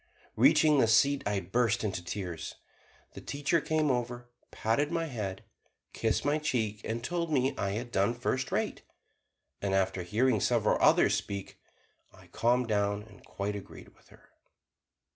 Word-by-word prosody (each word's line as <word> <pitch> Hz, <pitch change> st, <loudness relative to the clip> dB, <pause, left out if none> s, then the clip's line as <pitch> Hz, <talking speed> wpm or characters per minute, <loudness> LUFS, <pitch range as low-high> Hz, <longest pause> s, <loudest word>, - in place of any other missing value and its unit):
Reaching 150 Hz, -2 st, +5 dB
the 115 Hz, -, +4 dB
seat, 140 Hz, +5 st, +4 dB
I 100 Hz, -1 st, 0 dB
burst 115 Hz, +4 st, 0 dB
into 95 Hz, -4 st, -3 dB
tears. 85 Hz, -3 st, -5 dB, 0.6 s
The -, -, -9 dB
teacher 145 Hz, +3 st, 0 dB
came 155 Hz, -1 st, +1 dB
over, 120 Hz, 0 st, -3 dB, 0.2 s
patted 140 Hz, +8 st, 0 dB
my 165 Hz, -1 st, 0 dB
head, 105 Hz, -10 st, -5 dB, 0.5 s
kissed 110 Hz, +3 st, 0 dB
my 145 Hz, +2 st, +2 dB
cheek, 110 Hz, -9 st, -1 dB
and 115 Hz, +1 st, -3 dB
told 170 Hz, +2 st, -2 dB
me 135 Hz, -2 st, +1 dB
I 100 Hz, 0 st, -2 dB
had 120 Hz, +3 st, -4 dB
done 100 Hz, +4 st, +1 dB
first 130 Hz, +2 st, -2 dB
rate, -, -, -1 dB, 0.8 s
and 95 Hz, -1 st, 0 dB
after 95 Hz, -1 st, +1 dB
hearing 110 Hz, +6 st, +1 dB
several -, -, +2 dB
others -, -, +5 dB
speak 100 Hz, -1 st, -4 dB, 0.5 s
I -, -, -18 dB
calmed 125 Hz, +1 st, +1 dB
down 100 Hz, -1 st, 0 dB
and 105 Hz, -3 st, -17 dB
quite 100 Hz, +1 st, -4 dB
agreed 100 Hz, -, -10 dB
with -, -, -26 dB
her. -, -, -21 dB
115 Hz, 155 wpm, -30 LUFS, 100-135 Hz, 0.8 s, Reaching